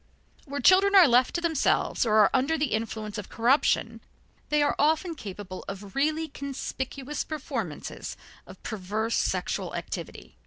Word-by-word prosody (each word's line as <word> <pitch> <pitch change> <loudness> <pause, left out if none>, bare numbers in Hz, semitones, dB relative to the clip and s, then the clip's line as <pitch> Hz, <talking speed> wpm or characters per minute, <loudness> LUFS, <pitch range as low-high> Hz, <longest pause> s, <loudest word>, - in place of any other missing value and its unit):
Where 285 -1 -5
children 390 +5 +5
are 370 -5 +9
left 250 0 +3
to 345 - 0
themselves 320 -6 +1
or 215 - +2
are 210 -2 +6
under 275 +5 +2
the 295 -6 -1
influence 220 -1 -3
of 205 - -8
corruption, 245 +6 +2 0.5
they 300 0 +3
often 315 +4 +1
are - - -3
capable 195 - -8
of 195 0 -8
really 310 +3 0
conspicuous 275 0 -5
performances 255 - -5 0.3
of - - -14
perverse 220 +2 -2
sexual - - -1
activity. - - -7
265 Hz, 145 wpm, -27 LUFS, 215-305 Hz, 0.5 s, are